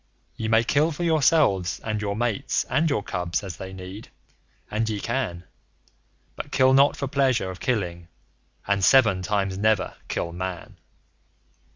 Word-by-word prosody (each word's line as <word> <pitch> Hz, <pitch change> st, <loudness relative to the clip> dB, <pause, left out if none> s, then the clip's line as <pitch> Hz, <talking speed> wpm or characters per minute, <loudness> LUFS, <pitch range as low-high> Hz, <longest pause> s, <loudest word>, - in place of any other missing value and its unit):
Ye 110 Hz, -, -4 dB
may 110 Hz, +1 st, +4 dB
kill 150 Hz, +7 st, +2 dB
for 165 Hz, +3 st, -4 dB
yourselves, 150 Hz, -, +2 dB
and 110 Hz, -1 st, -2 dB
your 100 Hz, -1 st, -2 dB
mates, 115 Hz, -2 st, 0 dB
and 160 Hz, +2 st, +1 dB
your 135 Hz, -8 st, 0 dB
cubs 90 Hz, 0 st, -2 dB
as 95 Hz, -3 st, -7 dB
they 95 Hz, 0 st, -7 dB
need, 95 Hz, +3 st, -9 dB, 0.6 s
and 110 Hz, +1 st, 0 dB
ye 105 Hz, -2 st, -2 dB
can; 115 Hz, -8 st, -3 dB, 0.9 s
But -, -, -7 dB
kill 130 Hz, 0 st, +4 dB
not 140 Hz, +2 st, +5 dB
for 140 Hz, -, -3 dB
pleasure 130 Hz, -8 st, +1 dB
of 90 Hz, -, -10 dB
killing, 90 Hz, -8 st, -2 dB, 0.6 s
and 100 Hz, -1 st, 0 dB
SEVEN 110 Hz, -6 st, +5 dB
TIMES 95 Hz, 0 st, -1 dB
NEVER 105 Hz, -3 st, +1 dB
KILL 85 Hz, -, -3 dB
MAN. 90 Hz, 0 st, -6 dB
105 Hz, 155 wpm, -24 LUFS, 95-130 Hz, 0.9 s, not